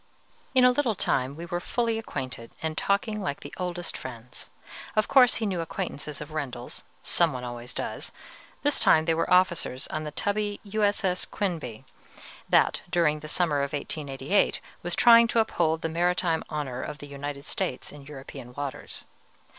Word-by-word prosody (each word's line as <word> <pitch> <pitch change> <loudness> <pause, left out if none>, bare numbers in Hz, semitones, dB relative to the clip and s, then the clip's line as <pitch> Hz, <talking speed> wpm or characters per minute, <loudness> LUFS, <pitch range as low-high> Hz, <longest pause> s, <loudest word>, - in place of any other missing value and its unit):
In 255 -1 +7
a 250 - +8
little 250 -4 +1
time 135 -5 0
we 165 +2 -6
were 175 +1 -2
fully 230 +4 0
acquainted, 130 - -5
and 160 -1 -1
talking 210 +4 0
like 150 -7 -3
the - - -9
oldest 175 -1 -3
friends. 120 -1 -8 0.5
Of 215 -1 +3
course 255 -3 +6
he 225 - -1
knew 185 -4 0
acquaintances 160 -4 -4
of 150 0 -8
Rendel's, 130 -5 -4 0.2
some - - +3
one 125 -1 -5
always 120 0 -6
does: - - -4 0.5
this 290 0 +3
time 160 0 +5
they 165 - +3
were 165 - 0
officers 170 -7 +3
on 155 - -3
the 150 - -3
tubby 205 +5 -1
U. 215 +1 -2
S. 205 0 +2
S. 180 -1 +1
"Quinebaug," 155 - -3 0.7
that, - - +4
during 155 -3 +2
the 155 - -8
summer 155 -1 +2
of 140 +1 -2
1888, 145 +4 0 0.2
was 175 0 -2
trying 235 -1 +8
to 230 - +2
uphold 165 -7 +1
the - - +1
maritime 170 0 +1
honor 135 -5 -3
of 150 - -5
the 145 - -9
United 140 0 -6
States 125 - -2
in 145 - -11
European 135 -3 -9
waters. 140 -2 -5
160 Hz, 175 wpm, -27 LUFS, 140-200 Hz, 0.7 s, a